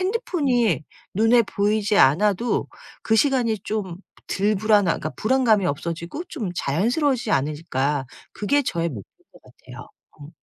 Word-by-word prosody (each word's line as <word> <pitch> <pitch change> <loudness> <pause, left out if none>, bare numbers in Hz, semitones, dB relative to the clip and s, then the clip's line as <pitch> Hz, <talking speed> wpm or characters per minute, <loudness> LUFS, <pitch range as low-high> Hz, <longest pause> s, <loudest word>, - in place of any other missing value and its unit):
핸드폰이 285 - 0 0.3
눈에 225 +4 +4
보이지 205 +1 0
않아도 205 - +2 0.3
그 220 - +2
시간이 245 -4 +2
좀 200 -5 -3 0.3
덜 205 +2 +1
불안한 210 0 +3 0.2
그러니까 155 - -4
불안감이 220 -5 +2
없어지고 170 - -4
좀 230 - -4
자연스러워지지 240 - 0
않을까.' 145 -1 -1 0.3
그게 285 +8 +1
저의 170 -8 -2
목표인 105 -9 -8 0.3
것 - - -18
같아요. - - -13 0.3
음. 145 +1 -11
210 Hz, 320 characters per minute, -23 LUFS, 170-245 Hz, 0.3 s, 눈에